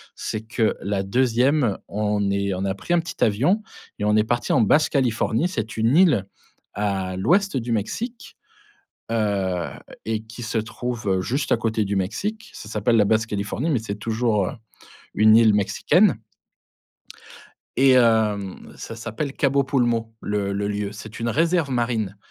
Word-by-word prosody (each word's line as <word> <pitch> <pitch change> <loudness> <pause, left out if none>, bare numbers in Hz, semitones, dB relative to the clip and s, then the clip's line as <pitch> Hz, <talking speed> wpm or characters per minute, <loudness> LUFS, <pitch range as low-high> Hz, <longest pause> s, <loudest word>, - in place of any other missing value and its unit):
c'est 110 - -4
que 110 0 0
la 100 0 -1
2e 125 +2 +2
on 105 -1 -1
est 100 0 0
on 95 +1 -3
a 95 - 0
pris 170 - -3
un 175 - +3
petit 165 - -3
avion 140 - +2 0.4
et 105 - -1
on 105 0 +3
est 105 - +4
parti 120 +2 -1
en 125 - +4
Basse-Californie, 130 - +2
c'est 115 - -4
une 115 +4 +2
île 150 - +4 0.5
à 95 -3 -2
l'ouest 180 - +2
du 120 -1 -3
Mexique. 225 - -4 0.7
Heu, 100 -6 0 0.4
et 110 0 -2
qui 115 +2 -9
se 115 0 -2
trouve 110 -4 -2
juste 135 +8 -1
à - - +2
côté 110 -2 -1
du 100 - -2
Mexique, 190 - -3
ça - - -10
s'appelle 110 +2 +1
la 105 - +4
Basse-Californie, 110 +5 -1
mais 140 -7 +2
c'est 110 -2 -5
toujours, 110 -2 0
heu, - - -3 0.6
une 110 +1 +6
île 110 -2 +5
mexicaine 100 -1 +3 1.6
et 135 0 +5
hem, 110 -5 +2
ça 115 - -8
s'appelle 115 +5 -4
Cabo 140 0 +2
Pulmo, 120 -4 0
le 100 -1 -2
le 100 +1 -2
lieu. 105 0 -3
C'est 110 +2 -10
une 115 - -1
réserve 165 +3 +1
marine 115 -5 -1
110 Hz, 160 wpm, -23 LUFS, 105-125 Hz, 1.6 s, une